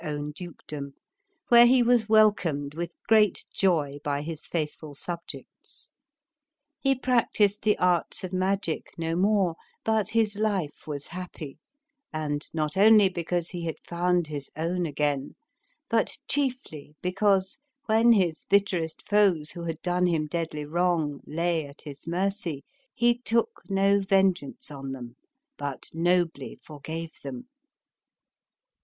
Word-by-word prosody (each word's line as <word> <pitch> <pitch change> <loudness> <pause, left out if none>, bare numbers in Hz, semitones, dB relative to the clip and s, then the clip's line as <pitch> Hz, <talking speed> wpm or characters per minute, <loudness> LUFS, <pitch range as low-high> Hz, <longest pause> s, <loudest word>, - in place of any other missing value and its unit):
own 150 -1 -3
dukedom, 150 -4 -8 0.5
where 240 0 +9
he 250 0 +5
was 235 -2 +3
welcomed 180 -10 +3
with 170 +2 -3 0.2
great 215 -3 +4
joy 150 -7 +1
by 145 0 -1
his 160 0 -7
faith 155 -3 -2
ful 150 -2 -11
subjects. 170 +3 -8 0.9
He 270 -1 +2
practised 230 -5 +2
the 210 0 +2
arts 180 -1 +1
of 185 0 -5
magic 185 -3 -1
no 165 0 -1
more, 190 -2 +2 0.3
but 220 -3 +1
his 220 -2 +1
life 200 -10 -2
was 145 -2 -5
happy, 175 -5 -7 0.5
and 150 -1 -3
not 155 -2 -2
only 210 0 +7
because 175 -1 -2
he 175 -2 -5
had 160 - -2
found 175 0 +1
his 145 -2 -6
own 170 +3 -1
again, 145 -2 -1 0.6
hut - - +1
chiefly 250 - -3
because, 190 +2 +1 0.3
when 225 +2 +5
his 175 -7 +1
bitterest 185 -5 +1
foes 195 -8 +3
who 170 -1 -7
had 165 -1 -5
done 180 0 +2
him 160 -3 +1
deadly 150 -1 -3
wrong 165 -2 0
lay 165 -1 -1
at 140 +1 -15
his 145 0 -10
mercy, 175 -4 -2 0.3
he 240 0 +3
took 230 -2 0
no 195 +1 +3
vengeance 190 -7 +1
on 135 -2 -6
them, 120 -2 -8 0.4
but 140 -2 -5
nobly 175 +1 0
forgave 160 +2 -7
them. 250 -1 -7
175 Hz, 135 wpm, -27 LUFS, 150-200 Hz, 0.9 s, where